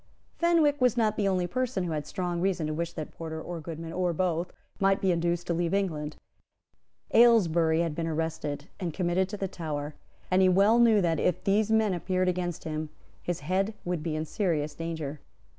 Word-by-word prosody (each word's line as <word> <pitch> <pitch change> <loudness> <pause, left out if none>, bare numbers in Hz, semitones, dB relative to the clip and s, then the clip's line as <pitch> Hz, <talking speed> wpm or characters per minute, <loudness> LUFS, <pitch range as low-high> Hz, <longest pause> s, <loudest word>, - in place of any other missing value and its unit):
Fenwick 325 -5 +3
was 250 -1 +3
not 215 -2 +2
the 205 -2 +1
only 185 -2 +1
person 250 -1 -1
who 175 - -3
had 150 -2 -3
strong 175 -2 -2
reason 185 -4 0
to 155 - -2
wish 170 +2 -2
that 155 -2 -6
Porter 160 -1 -5
or 170 +1 -6
Goodman, 165 +1 -7
or 180 -1 0
both, 175 0 -1 0.3
might 195 0 +3
be 190 - +2
induced 175 0 0
to 170 - -1
leave 170 +2 0
England. 155 -7 -2 1.0
Aylesbury 170 -9 +5
had 165 -2 -1
been 165 +1 -3
arrested, 155 -2 -3
and 175 -5 -3
committed 185 +1 +1
to 210 - -5
the 195 - -2
Tower; 150 -4 -4 0.4
and 185 +1 +4
he 185 - +6
well 200 +5 +5
knew 225 -3 +5
that, 165 -3 +1
if 180 - 0
these 205 +2 +2
men 220 -3 +3
appeared 185 +1 0
against 175 -2 -2
him, 155 -1 -4 0.3
his 175 -3 -3
head 190 +7 0
would 175 -2 -1
be 155 -1 -2
in 155 0 -2
serious 155 -5 -1
danger. 160 -3 -5
175 Hz, 195 wpm, -28 LUFS, 160-195 Hz, 1.0 s, he